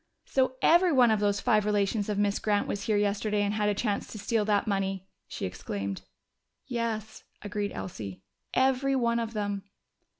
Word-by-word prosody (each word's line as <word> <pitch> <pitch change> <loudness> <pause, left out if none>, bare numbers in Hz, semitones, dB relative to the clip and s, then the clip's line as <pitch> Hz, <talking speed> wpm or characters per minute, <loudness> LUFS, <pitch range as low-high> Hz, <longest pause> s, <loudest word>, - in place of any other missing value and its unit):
"So 260 -1 +1
every 345 +2 +6
one 250 -5 +5
of 215 - +2
those 205 -1 +1
five 215 -4 +3
relations 205 0 0
of 205 - -1
Miss 205 0 +1
Grant 205 -1 +1
was 200 0 -3
here 215 -2 +2
yesterday 205 0 +1
and 205 0 0
had 210 -1 +1
a 205 - 0
chance 205 -1 -1
to - - -8
steal 215 +2 0
that 205 -1 +2
money!" 195 -2 -1 0.2
she - - -5
exclaimed. 95 +1 -4 0.6
"Yes," 225 -3 -3 0.2
agreed 205 0 -2
Elsie. 100 - -7 0.3
"Every 265 +1 +2
one 235 -2 +2
of 230 -1 -3
them!" 205 -2 -2
210 Hz, 175 wpm, -28 LUFS, 200-230 Hz, 0.6 s, every